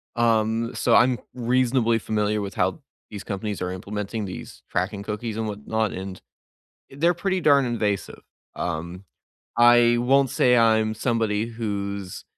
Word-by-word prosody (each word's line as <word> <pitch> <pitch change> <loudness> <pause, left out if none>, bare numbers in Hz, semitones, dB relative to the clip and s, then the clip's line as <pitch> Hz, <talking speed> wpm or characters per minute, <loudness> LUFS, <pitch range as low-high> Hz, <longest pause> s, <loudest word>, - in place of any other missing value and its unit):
Um, 115 0 +1
so 115 -2 +3
I'm 125 0 +4 0.2
reasonably 125 -1 +2
familiar 105 -1 -1
with 100 -1 -5
how - - 0 0.3
these 105 -2 -8
companies 100 0 -4
are 90 0 -2
implementing 105 +3 -4
these 95 - -9
tracking 100 +3 -2
cookies 105 +1 -4
and 110 - -2
whatnot, 105 0 -2
and 95 0 -7 0.7
they're 165 +6 +2
pretty 190 +2 -1
darn 140 -3 +5
invasive. 105 -4 -2 0.3
Um, 85 +3 -4 0.5
I 120 0 +6
won't 135 +2 +3
say 125 -1 +3
I'm 110 -1 +3
somebody 110 -2 0
who's, 100 -4 -5
110 Hz, 135 wpm, -24 LUFS, 100-120 Hz, 0.7 s, I